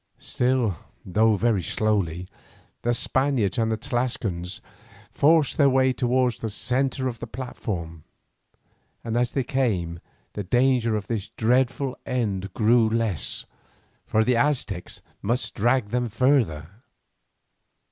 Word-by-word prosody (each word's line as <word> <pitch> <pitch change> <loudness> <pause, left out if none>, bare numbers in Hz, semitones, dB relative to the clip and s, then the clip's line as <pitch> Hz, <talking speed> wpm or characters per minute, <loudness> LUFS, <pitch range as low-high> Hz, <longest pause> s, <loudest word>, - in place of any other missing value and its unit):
Still, 125 -7 0 0.3
though 110 +4 +3
very 110 -1 +1
slowly, 90 -4 -1 0.5
the 120 - +1
Spaniards 125 -4 +1
and 115 0 +1
Tlascalans 105 -8 -2 0.5
forced 155 0 +3
their 140 -2 +6
way 130 0 +3
towards 125 -1 +1
the 110 - -3
centre 130 +4 0
of 120 -3 -5
the 120 - -6
platform, 90 - -6 1.0
and 115 -1 -3
as 120 0 +1
they 135 - 0
came 100 -11 -1 0.3
the 105 - -4
danger 120 +2 +2
of 105 -2 -3
this 110 -2 -3
dreadful 125 +3 +1
end 100 -6 -2
grew 115 +1 +4
less, 110 - -2 0.6
for 110 - +3
the 125 +2 +2
Aztecs 120 -9 -1 0.2
must 125 +3 -1
drag 120 0 +1
them 120 +1 -1
further. 110 - +1
115 Hz, 120 wpm, -25 LUFS, 100-130 Hz, 1.0 s, their